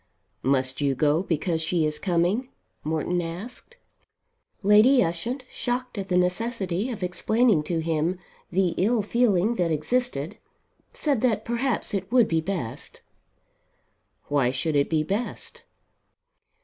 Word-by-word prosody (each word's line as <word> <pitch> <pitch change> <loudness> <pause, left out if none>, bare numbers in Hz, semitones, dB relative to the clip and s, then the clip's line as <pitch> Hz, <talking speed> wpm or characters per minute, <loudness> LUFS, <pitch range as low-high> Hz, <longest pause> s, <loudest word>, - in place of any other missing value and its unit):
"Must 130 0 0
you 140 -2 +1
go 150 +4 +2
because 165 -2 -1
she 165 0 +1
is 150 0 -1
coming?" 185 +8 0 0.3
Morton 160 +3 -1
asked. 200 - -8 0.9
Lady 215 +6 +6
Ushant, 230 +11 -3
shocked 250 0 -3
at 195 -2 -5
the 180 - +2
necessity 190 +2 0
of 215 -6 -5
explaining 215 +1 +2
to 165 -1 -1
him 165 +2 0 0.3
the 185 0 +2
ill 220 +3 +2
feeling 215 -2 +2
that 175 -2 +1
existed, 165 - -1 0.5
said 280 -7 0
that 245 -4 +1
perhaps 235 -1 -1
it 195 0 -3
would 245 -3 +5
be 160 -1 +1
best. 160 -10 -5 1.2
"Why 140 -4 +2
should 145 +4 -1
it 140 0 +2
be 155 -2 +1
best?" 240 - -4
180 Hz, 130 wpm, -25 LUFS, 160-235 Hz, 1.2 s, Lady